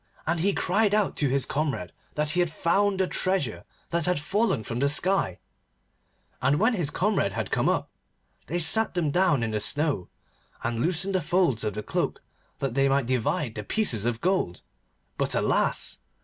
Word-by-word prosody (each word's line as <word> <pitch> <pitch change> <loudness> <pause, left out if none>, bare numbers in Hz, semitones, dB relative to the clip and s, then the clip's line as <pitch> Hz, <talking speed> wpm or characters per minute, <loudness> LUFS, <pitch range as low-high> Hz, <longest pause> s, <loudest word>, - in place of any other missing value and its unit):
And 165 +1 0
he 195 +5 +2
cried 205 +2 +2
out 210 -2 +1
to 145 - +1
his 135 0 +1
comrade 140 - -2 0.2
that 150 0 0
he 175 - 0
had 175 -1 +2
found 195 +5 +1
the 190 - +3
treasure 185 - 0 0.3
that 170 -1 0
had 180 -4 +1
fallen 190 - 0
from 115 +2 -4
the 140 +2 +2
sky, 175 - +1 1.0
and 140 +3 +2
when 225 +5 +3
his 175 -9 -1
comrade 185 - 0
had - - -4
come - - +2
up, - - 0 0.6
they 170 - -2
sat 180 +6 +2
them 160 -5 0
down 175 -7 +2
in 110 - -1
the 105 - -1
snow, 145 - +1 0.6
and 115 -1 -2
loosened 180 +7 0
the 185 - +1
folds 165 - +1
of 105 -2 -2
the 105 - -4
cloak - - -2 0.3
that 135 -4 -2
they 135 +1 +2
might 135 -1 +2
divide 125 0 -1
the 105 - -5
pieces 120 - 0
of 120 -1 -2
gold. 185 - 0 0.6
But, - - +1
alas! - - +1
150 Hz, 185 wpm, -26 LUFS, 125-185 Hz, 1.0 s, the